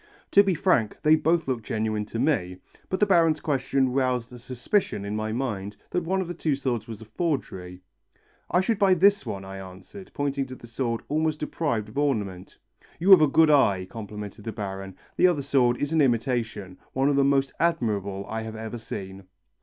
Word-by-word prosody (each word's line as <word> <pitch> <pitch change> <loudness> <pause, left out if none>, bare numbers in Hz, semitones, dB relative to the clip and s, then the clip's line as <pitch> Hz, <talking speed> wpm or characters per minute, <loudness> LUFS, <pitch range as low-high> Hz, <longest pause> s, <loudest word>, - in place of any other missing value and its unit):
To 200 - +8
be 195 -3 +1
frank, 130 - +1
they 155 0 +6
both 160 0 +1
looked 125 -4 -2
genuine 110 -1 -2
to 110 - -6
me, 115 - 0 0.3
but 185 - -1
the 210 - +5
Baron's 165 -5 +3
question 135 -3 0
roused 125 -2 0
a 120 - -10
suspicion 125 - -1
in 105 +1 -3
my 110 0 -2
mind 105 -5 -3
that 180 - 0
one 190 +3 0
of 185 - -4
the 175 - -4
two 155 -4 -1
swords 120 -5 -2
was 115 -1 -8
a - - -10
forgery. 105 - -4 0.7
"I 180 - +3
should 215 +2 0
buy 195 -3 +5
this 200 +3 +3
one," 95 -1 -5
I 95 0 -8
answered, 95 - -11
pointing 140 -1 -1
to 130 - -8
the 120 - -13
sword 115 0 -3
almost 155 0 0
deprived 145 -8 -2
of 120 - -4
ornament. 105 -11 -2 0.4
"You 185 +4 +3
have 185 -4 +10
a 155 - +6
good 155 +2 +4
eye," 100 -10 +3
complimented 105 -1 -8
the 115 - -4
Baron. 95 -3 -6 0.2
"The - - +6
other 160 -6 0
sword 125 -3 +2
is 145 +2 -2
an 160 - +4
imitation, 115 -7 -1
one 135 +1 +1
of 145 - +2
the 140 - +4
most 135 0 +2
admirable 105 - 0
I 110 0 -3
have 110 0 -7
ever 110 +1 -6
seen." 95 -3 -7
125 Hz, 200 wpm, -26 LUFS, 105-155 Hz, 0.7 s, have